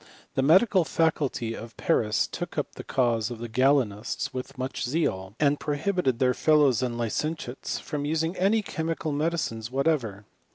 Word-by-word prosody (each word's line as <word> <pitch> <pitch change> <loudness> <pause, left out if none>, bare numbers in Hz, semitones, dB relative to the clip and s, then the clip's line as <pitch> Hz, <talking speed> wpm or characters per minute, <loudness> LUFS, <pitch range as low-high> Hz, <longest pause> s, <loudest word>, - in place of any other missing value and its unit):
The - - +1
medical 185 - +5
faculty 150 -8 0
of 115 0 -9
Paris 105 -2 +2
took - - -6
up - - -2
the - - -8
cause 120 -4 +1
of 120 - -6
the 120 +1 -6
Galenists 120 -3 +1
with 130 +2 -6
much 130 +1 -3
zeal, 110 - -1
and 145 -1 +3
prohibited 150 -3 0
their 130 0 +3
fellows 145 -6 +4
and 125 -2 -1
licentiates 125 +3 -3
from 145 -2 -4
using 160 +3 0
any 205 +4 +2
chemical 160 -3 -3
medicines 145 -7 -1
what 135 +4 0
ever. 110 -11 0
135 Hz, 160 wpm, -27 LUFS, 120-160 Hz, -, medical